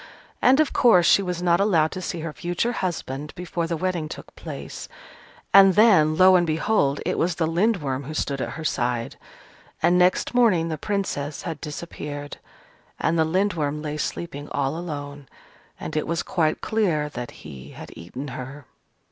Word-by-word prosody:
And, 265 +3 +5
of 310 - +2
course, 185 -9 +5
she 200 - +5
was 180 -2 -3
not 175 -1 +3
allowed 170 -6 +3
to 185 - -5
see 170 -2 -4
her 160 -1 -5
future 175 +8 -1
husband 150 - -4
before 175 -1 -3
the 165 0 -2
wedding 175 -3 -2
took - - -10
place, - - -8 0.6
and 195 -2 +8
then, 180 -9 +5
lo 185 0 +7
and 175 -1 +3
behold! 155 -3 +1
it - - -1
was 175 0 +1
the 165 - 0
Lindworm 165 - 0
who 155 +3 -6
stood 140 -3 -2
at - - -3
her 160 - -6
side. 120 -4 -1 0.6
And 175 +2 +3
next 180 +6 +2
morning 205 -10 +3
the 155 - -3
Princess 190 -8 -3
had 160 -3 -5
disappeared: 145 -2 -7 0.6
and 165 - +1
the 160 - +4
Lindworm 160 -4 -1
lay 150 0 -4
sleeping 150 -2 -5
all 140 +1 -1
alone; 145 -4 -6 0.5
and - - -6
it 155 - -1
was 170 0 -1
quite 160 -4 0
clear 180 -9 0
that 125 -4 -6 0.2
he 70 -2 -10
had - - -10
eaten 125 +12 -7
her. 130 +3 -8
165 Hz, 175 wpm, -24 LUFS, 145-185 Hz, 0.6 s, and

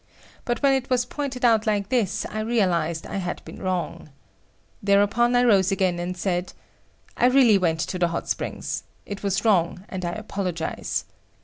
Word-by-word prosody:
But 240 +1 -2
when 275 -1 +5
it 265 -1 -1
was 250 -1 +2
pointed 265 -1 -3
out 225 -2 +4
like 205 -2 0
this, 230 -7 0
I 215 - -5
realised 180 -8 0
that - - -10
I - - -2
had 180 -2 -4
been - - -10
wrong. 180 -4 -3 0.7
Thereupon 205 +5 +3
I 245 - +5
rose 200 -5 +4
again 185 -3 +1
and 180 +1 -4
said; 180 0 -2 0.6
"I 245 - +4
really 250 -6 +5
went 165 -3 +1
to 180 - -3
the 175 - +3
hot 170 0 -4
springs. - - -3 0.2
It 200 -1 -6
was 200 +2 -1
wrong 180 -3 +2
and 185 -1 -5
I 175 0 -2
apologize." 185 -6 -3
200 Hz, 180 wpm, -24 LUFS, 180-240 Hz, 0.7 s, when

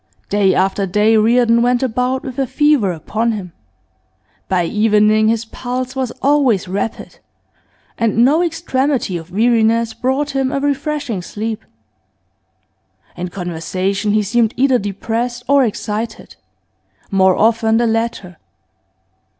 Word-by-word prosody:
Day 200 -2 +2
after 195 +1 0
day 210 +4 +3
Reardon 230 +1 +3
went 245 +1 +2
about 255 +1 -1
with 260 0 -6
a 270 - 0
fever 295 -9 +2
upon 220 +8 -2
him. 185 -5 -7 1.0
By 180 -2 +1
evening 215 +2 +3
his 225 0 0
pulse 255 +3 -5
was 260 -2 -1
always 265 -9 +2
rapid, 200 +4 -4 0.8
and 230 +1 +3
no 300 +6 +3
extremity 290 - -1
of 165 0 -7
weariness 225 +2 +2
brought 265 +5 -1
him 270 -1 -1
a 275 - -1
refreshing 285 - -2
sleep. 220 +4 -5 1.5
In 180 - -4
conversation 185 +3 -2
he 215 0 +2
seemed 225 +2 +1
either 260 -1 +3
depressed 230 +5 -3
or 280 0 +4
excited, 220 0 -4 0.8
more 190 -1 +4
often 225 0 +2
the 235 - +2
latter. 225 -6 -2
225 Hz, 125 wpm, -17 LUFS, 205-255 Hz, 1.5 s, or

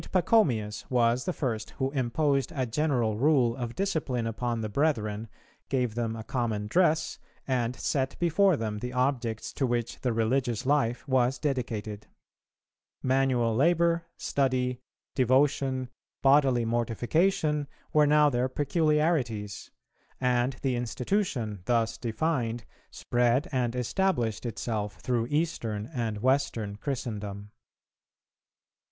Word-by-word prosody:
Pachomius 150 - +2
was 120 0 +2
the 180 - 0
first 115 -10 -3
who 135 0 -1
imposed 135 +1 0
a 130 -2 0
general 120 -4 0
rule 130 -4 +3
of 120 -2 -5
discipline 155 -11 -1
upon 115 +1 -2
the 110 - -2
brethren, 110 -4 0 0.4
gave 125 -4 0
them 115 -1 -2
a 110 - -6
common 115 -4 -2
dress, 160 - +1 0.3
and 125 -2 0
set 135 +1 -1
before 175 +1 +3
them 110 -3 -3
the 125 +2 -5
objects 125 -4 -1
to 135 - 0
which 120 -1 -2
the 125 - 0
religious 115 +1 0
life 130 -2 +1
was 130 0 +2
dedicated. 115 -7 -3 1.0
Manual 130 -3 +2
labour, 170 +4 +2
study, 130 -2 0 0.3
devotion, 130 0 +2 0.4
bodily 135 -3 +4
mortification, 145 - +1 0.3
were 150 -1 +5
now 150 0 +5
their 125 -2 +1
peculiarities; 145 - 0 0.5
and 125 0 +1
the 130 -2 +1
institution, 120 - -1
thus 115 -2 +1
defined, 120 -1 -1 0.2
spread 120 +3 +1
and 125 -3 0
established 125 - 0
itself 105 -3 -3
through 120 -2 -1
Eastern 120 -9 -1
and 110 -4 -3
Western 125 -6 +1
Christendom. 105 -6 -5
125 Hz, 115 wpm, -28 LUFS, 115-145 Hz, 1.0 s, were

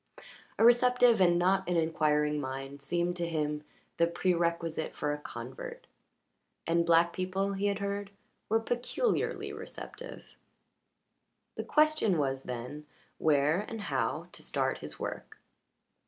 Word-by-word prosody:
A 225 - +5
receptive 245 -2 +5
and 175 -1 +5
not 190 +1 +2
an 175 - +2
inquiring 150 -2 +2
mind 135 +1 -6
seemed 175 +5 -1
to 170 -1 -2
him 150 -2 -1 0.3
the 170 - +4
prerequisite 170 -2 0
for 150 - -1
a 150 - -3
convert. - - -8 0.8
And 170 0 +2
black 170 +1 +5
people, 190 +2 -1
he 200 +1 0
had 200 -1 0
heard, 200 0 -3 0.4
were 225 +1 +4
peculiarly 245 - -1
receptive. - - -9 1.2
The - - -3
question 305 - +3
was, 135 -2 0
then, 125 +5 -6 0.3
where 150 +2 +3
and 225 +1 -6
how 145 - -1
to - - -8
start 135 -2 -1
his 75 0 -7
work. - - -6
170 Hz, 130 wpm, -31 LUFS, 150-200 Hz, 1.2 s, A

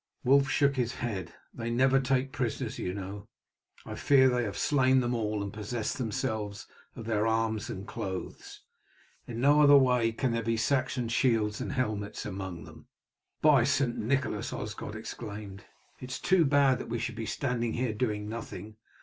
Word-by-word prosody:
Wulf 135 +1 +4
shook 140 0 +2
his 120 -2 -1
head. 95 -8 -4 0.2
"They 115 -1 -4
never 130 +3 +4
take 135 0 0
prisoners, 125 0 -3
you 90 - -2
know. 100 +2 -7 0.6
I - - -6
fear 130 -2 +5
they 125 -1 +1
have 100 -1 -4
slain 130 +2 +3
them 120 -1 0
all 105 -3 -1
and 100 - -6
possessed 110 +3 -3
themselves 105 -3 -3 0.3
of 115 - -8
their 110 -1 +1
arms 110 -1 0
and 95 +1 -6
clothes. 95 -2 -6 0.6
In 115 -1 -5
no 145 +4 +5
other 145 -1 +8
way 125 -4 +3
can 125 +2 -1
there 115 0 0
be 115 0 0
Saxon 125 +1 0
shields 115 -3 +1
and 135 - -3
helmets 110 -6 -2
among 95 -4 -5
them." - - -14 0.6
"By 145 -5 +6
St. 135 -2 +1
Nicholas!" 120 -2 -1
Osgod 105 0 -5
exclaimed, 105 -3 -7 0.3
"it 125 - -8
is 130 - -4
too 180 -3 +3
bad 140 -2 +4
that - - -7
we 120 - -1
should - - -3
be 110 - -4
standing 120 -4 -1
here 120 -2 -1
doing 105 -2 -2
nothing. 110 -2 -7
115 Hz, 175 wpm, -29 LUFS, 105-130 Hz, 0.6 s, other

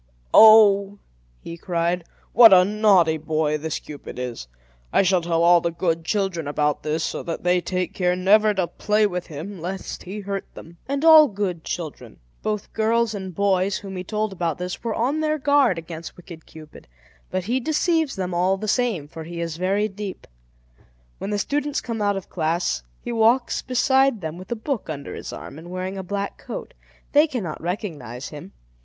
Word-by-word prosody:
"Oh!" 205 -2 +7 0.4
he 170 - -8
cried, 170 0 -1 0.3
"what 230 -1 +9
a 180 -1 +7
naughty 195 -6 +3
boy 155 -1 -1
this 160 0 -3
Cupid 145 -4 -10
is! 125 - -5 0.4
I - - +4
shall 185 -1 +2
tell 165 0 0
all 175 0 +6
the 170 - 0
good 165 -1 -1
children 190 -6 -1
about 150 0 0
this, 155 +1 -2
so - - -3
that 165 - -5
they 180 0 +2
take 180 0 -3
care 180 -1 +1
never 210 +4 +4
to 190 -2 +1
play 210 +4 +1
with 180 -3 -3
him, 165 +4 -8
lest 190 +3 -5
he 200 +3 -7
hurt 195 0 -5
them." 170 +1 -12
And 280 +3 -1
all 315 -2 +9
good 195 - -3
children, 160 -4 -6 0.2
both 210 -1 -3
girls 225 +1 +1
and 190 -4 -6
boys, 195 0 +1
whom 195 -2 -8
he 180 - -4
told 215 +1 -2
about 170 -4 -2
this, 180 0 -5
were 230 -2 -2
on 265 +7 0
their 310 0 0
guard 285 - +3
against 165 0 -8
wicked 170 -3 -12
Cupid; 155 -1 -14 0.4
but 185 0 -2
he 240 +7 0
deceives 315 +2 0
them 185 -2 -3
all 185 +2 +2
the 215 +2 -5
same, 210 - 0
for 160 +2 -9
he 170 +1 -7
is 165 -1 -4
very 195 +4 +1
deep. 200 -1 -7 0.9
When - - -4
the 205 - -1
students 290 +6 -1
come 230 -3 -5
out 205 -1 +1
of 195 - -7
class, 160 - -1 0.2
he - - -4
walks 235 +2 +2
beside 265 -2 +2
them 160 +1 -5
with 185 - -12
a - - 0
book 230 - -4
under 145 -3 -6
his - - -7
arm, 145 - -9
and 170 +2 -11
wearing 185 +1 -4
a - - -5
black 200 +2 -4
coat. - - -7 0.4
They 295 +1 +5
cannot 220 - -5
recognize 155 - -5
him. 145 -10 -10
190 Hz, 190 wpm, -23 LUFS, 170-215 Hz, 0.9 s, what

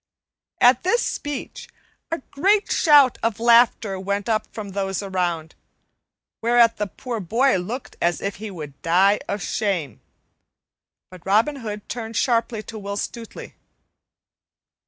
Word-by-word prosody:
At 245 +1 +5
this 465 +7 +1
speech 290 -3 -5 0.4
a 330 -4 -4
great 400 +8 +2
shout 290 -5 +5
of 225 -2 -1
laughter 230 -4 +4
went 200 +1 -2
up 220 -2 0
from 210 -2 -7
those 195 0 -3
around, 175 -4 -2 0.9
whereat 235 0 +4
the 210 - -2
poor 230 +7 -6
boy 230 +7 +2
looked 220 +9 -6
as 170 0 +2
he 205 +2 -5
would 150 -7 -9
die 190 +4 +3
of 200 -1 -3
shame; 175 - -2 1.1
but 180 -2 -13
Robin 220 +10 +2
Hood 210 -4 -7
turned 225 -2 -5
sharply 230 -3 0
to 220 0 -8
Will 200 0 -5
Stutely. 230 +1 -7
215 Hz, 130 wpm, -22 LUFS, 195-240 Hz, 1.1 s, At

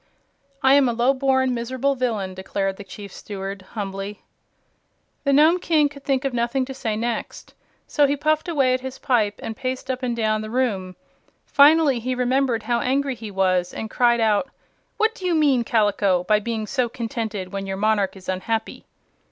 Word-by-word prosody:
"I 265 0 +6
am 280 -3 +5
a - - 0
lowborn, 260 +1 +2
miserable 255 +3 -1
villain," 225 -8 -2
declared 195 +1 -3
the 200 - -8
Chief 200 0 -10
Steward, 195 -1 -6
humbly. 200 -1 -5 1.0
The 280 - +3
Nome 310 +6 +5
King 310 -4 +2
could 280 -1 -13
think 270 -1 0
of 270 - -1
nothing 240 +2 0
to 265 - -7
say 235 -5 -3
next, 235 +1 -4 0.3
so 290 -2 +3
he 285 +1 0
puffed 310 +3 0
away 275 -6 +2
at 255 - 0
his 260 0 -6
pipe 215 -6 +1
and 225 - -4
paced 255 +2 -3
up 255 0 -4
and 245 -2 -1
down 215 -2 0
the 215 - -6
room. 205 -7 -1 0.5
Finally, 290 -2 +5
he 255 +2 -2
remembered 250 -2 +1
how 235 +1 0
angry 270 +2 0
he 225 -3 -8
was, 185 -2 0
and 220 - -5
cried 240 -1 +3
out: 220 +4 +2 0.5
"What 445 0 +2
do 465 - -13
you 355 -2 +1
mean, 280 -6 +3
Kaliko, 205 -5 +2
by 210 +3 +3
being 220 0 -3
so 250 +2 -1
contented 225 -5 -4
when 195 0 -4
your 195 0 -3
monarch 205 -1 +1
is 190 -1 -13
unhappy?" 220 +4 -3
235 Hz, 185 wpm, -23 LUFS, 210-270 Hz, 1.0 s, I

